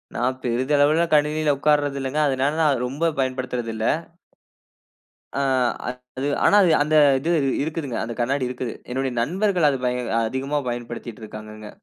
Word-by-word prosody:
நான் 125 +2 0
பெரிதளவில 145 +6 +2
கணினில 150 0 +2
உட்காருரது 145 -1 +2
இல்லங்க. 135 +3 -2
அதனால 135 +1 +1
நான் 155 - +4
அத, 135 - 0
ரொம்ப 155 +6 0
பயன்படுத்துறதில்ல. 125 -4 -3 1.5
அ, - - -5 0.8
அது, 135 +2 -1 0.2
ஆனா - - +5
அது, 180 - +4
அந்த 155 +1 0 0.2
இது 160 +6 -1 0.3
இருக்குதுங்க. 150 -5 -4
அந்த 115 +1 -4
கண்ணாடி 130 +2 0
இருக்குது. 125 -2 -4 0.2
என்னுடைய 130 +1 -1
நண்பர்கள் 180 - +1
அது 135 - 0
பய 125 0 0 0.3
அதிகமா 135 +5 -2
பயன்படுத்திட்ருக்காங்கங்க. 110 -3 -7
135 Hz, 130 wpm, -23 LUFS, 120-150 Hz, 1.5 s, ஆனா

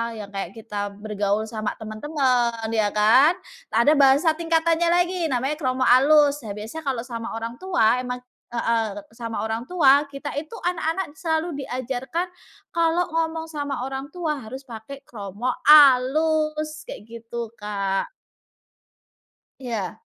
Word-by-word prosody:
yang 210 -2 -8
kayak 195 -1 -5
kita 210 -2 -4
bergaul 205 0 -1
sama 215 -1 -4
temen-temen 235 -1 -1
ya 215 -2 +2
kan 245 +11 +5 0.3
ada 235 +6 +4
bahasa 280 +4 +5
tingkatannya 330 +1 +1
lagi 355 -1 +1
namanya 270 +2 -1
kromo 260 -3 0
alus 285 +3 +5
nah 210 -4 -6
biasa 220 +9 -7
kalau 250 -4 -1
sama 235 -2 -6
orang 230 +1 -5
tua 250 -11 +2
emang, 250 0 -4 0.3
heeh, 230 -1 0 0.3
sama 230 -1 -4
orang 225 +1 -3
tua 285 -2 +4
kita 275 0 -6
itu 310 +5 -5
anak-anak 330 -2 -2
selalu 320 -3 -2
diajarkan, 260 +7 -3 0.5
kalau 335 +1 +2
ngomong 325 0 -2
sama 285 -4 -4
orang 270 +2 -6
tua 325 -4 -2
harus 255 +5 -8
pake 240 +4 -9
kromo 210 +3 -4
alus 305 +2 +5
kayak - - -9
gitu, 230 0 -6
Kak. 200 -2 -2 1.5
Iya. 230 -8 -4
260 Hz, 130 wpm, -23 LUFS, 225-310 Hz, 1.5 s, kan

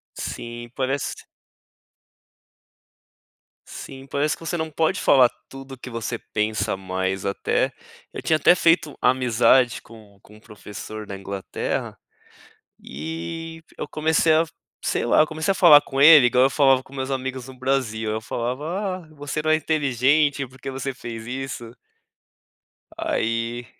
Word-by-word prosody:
Sim, 120 0 -6
parece 135 +1 -2 2.4
sim, 135 0 -10
parece, 140 +2 -1
que - - -22
você 175 - -2
não 160 -1 -3
pode 160 +5 0
falar 130 -3 +6 0.2
tudo 135 0 -10
que 125 - -9
você 115 0 -4
pensa 105 -1 -2
mais. 95 0 -3
Até 100 -1 0 0.4
eu - - -7
tinha 160 - +2
até 175 - +5
feito 165 -4 +2
amizade 125 -1 +3
com 110 -3 -16
com 105 - -17
um - - -18
professor 105 0 -9
da 100 - -6
Inglaterra 95 0 -4 0.9
e 85 - -6
eu - - -5
comecei 160 +1 +2
a 160 +1 +4 0.4
Sei - - 0
lá. - - +4
Eu 155 - +5
comecei 160 +4 -2
a - - +3
falar 160 -6 +8
com 135 -2 -7
ele 145 -2 +9
igual 125 +1 +4
eu 135 - +3
falava 135 -2 +4
com 130 - -20
meus 130 0 -4
amigos 130 -1 -4
no 130 -1 -12
Brasil, 125 -5 -1
eu 110 +1 -2
falava: 160 - -3
"Ah, - - -22
você 145 0 -4
não 155 +1 -1
é 155 - +5
inteligente, 145 -1 +1
porque 130 +2 -9
você 135 +1 -4
fez 115 -3 -8
isso." 125 -2 -6 1.2
Aí 115 +1 -2
130 Hz, 145 wpm, -23 LUFS, 115-150 Hz, 2.4 s, ele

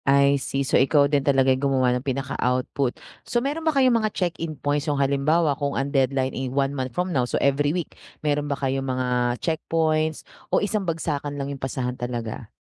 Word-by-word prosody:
I 140 0 +4
see, 135 +1 -2
so 125 - +3
ikaw 145 +1 +4
din 140 0 +2
talaga 135 -1 +3
yung 135 +2 0
gumawa 130 -2 +2
ng 125 - -1
pinaka-output. 130 -1 -1 0.2
So - - -3
meron 280 +6 -1
ba 320 - +1
kayong 255 -4 +4
mga 215 - +1
check-in 165 -4 -2
points, 145 +2 -1
yung 145 - 0
halimbawa 140 +3 +2
kung 140 0 -2
ang 140 +2 -2
deadline, 135 -1 +1
eh, 130 0 -3
1 135 +1 0
month 130 -2 -3
from 180 0 0
now, 130 - +2
so - - 0
every 140 +1 +2
week, 170 0 -3 0.3
meron 145 0 0
ba 140 - -1
kayong 135 -1 -1
mga 125 -1 0
checkpoints, 160 -1 0 0.2
o - - +2
isang 205 -3 0
bagsakan 145 -3 -3
lang 140 0 -3
'yung 135 - -10
pasahan 130 -1 -2
talaga? 120 -2 -4
140 Hz, 200 wpm, -24 LUFS, 130-155 Hz, 0.3 s, I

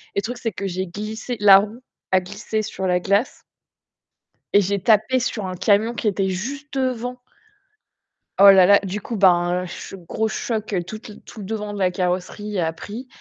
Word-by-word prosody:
Et - - +2
le - - -1
truc, 245 +4 -5
c'est 230 -2 -3
que 195 -1 -5
j'ai 185 +1 -3
glissé 215 +6 -6
la 200 -2 +8
roue 215 +5 -3 0.3
a 185 - +6
glissé 205 +4 -4
sur 190 -2 -5
la 180 0 +2
glace 200 +6 0 1.1
et 205 - +6
j'ai 200 +1 -1
tapé 220 +5 +3
sur 225 -4 -3
un 185 0 -4
camion 205 +5 +2
qui 230 - -3
était 195 -1 0
juste 275 +10 -5
devant. 250 -1 -2 1.2
Oh 200 0 +9
là 190 -2 +7
là! 200 +2 +6
Du 195 +2 -4
coup, 230 - -6
ben, 180 -2 +3
ch 180 +2 -8
gros 220 0 0
choc, 215 -1 -3
heu, 180 -2 0
toute 215 +6 -9
le 210 - -12
tout - - -13
le 200 - -7
devant 210 0 -4
de 205 - -6
la 185 -1 +3
carrosserie 185 +3 -3
a 165 -1 0
pris 220 +9 -8
205 Hz, 200 wpm, -22 LUFS, 185-220 Hz, 1.2 s, Oh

